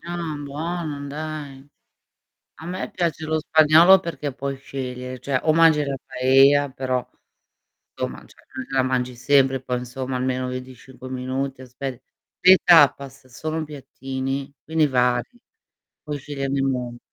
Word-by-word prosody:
Ah, 170 -2 -4
buono 150 0 -4
dai. 145 -2 -7 0.9
A - - -9
me 180 +2 -4
piace 165 -3 -2
lo 155 0 0
spagnolo 160 +4 +6
perché 155 -6 -5
puoi 140 +1 -4
scegliere, 130 -2 -6
cioè 135 -2 -1
o 155 - +3
mangi 160 -2 +5
la 140 - -2
paella 135 +2 +4
però, 130 -1 -2 0.9
somma 60 0 -5
cioè - - -20 0.4
l - - -6
la 135 - +3
mangi 125 -1 -1
sempre, 135 +1 +3
poi 125 -1 -2
insomma 130 +1 -5
almeno 130 0 -1
25 130 0 -9
minuti 130 +1 -3
aspe 130 0 -7 0.4
le 185 +1 +8
tapas 140 -5 +4
sono 155 +5 -4
piattini, 135 -1 -5
quindi 160 -1 +2
vari, 125 -2 +1 0.7
puoi 150 -1 -4
sceglierne 140 -1 -3
un 135 - +1
mondo. 120 -2 -4
135 Hz, 135 wpm, -23 LUFS, 130-155 Hz, 0.9 s, le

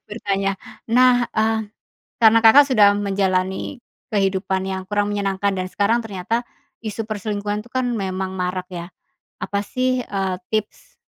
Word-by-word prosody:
bertanya. 195 -2 -1 0.4
Nah, 255 0 +6 0.2
eee, 220 0 +2 0.6
karena 225 0 +7
Kakak 280 +6 +9
sudah 210 -5 +6 0.2
menjalani 190 +4 -1 0.3
kehidupan 190 -1 0
yang 190 0 -3
kurang 205 0 +1
menyenangkan 200 -1 0
dan 185 - -2
sekarang 225 +4 +2
ternyata 220 +4 -2 0.4
isu 220 +1 -4
perselingkuhan, 210 0 -3
tuh, 245 - -19
kan, 255 -1 0
memang 190 -4 -3
marak, 180 0 -2
ya. 175 -1 -6 0.5
Apa, 200 0 -2
sih, 255 +4 -1
eee, 195 -5 -2
tips 220 - -4
205 Hz, 135 wpm, -21 LUFS, 190-225 Hz, 0.6 s, Kakak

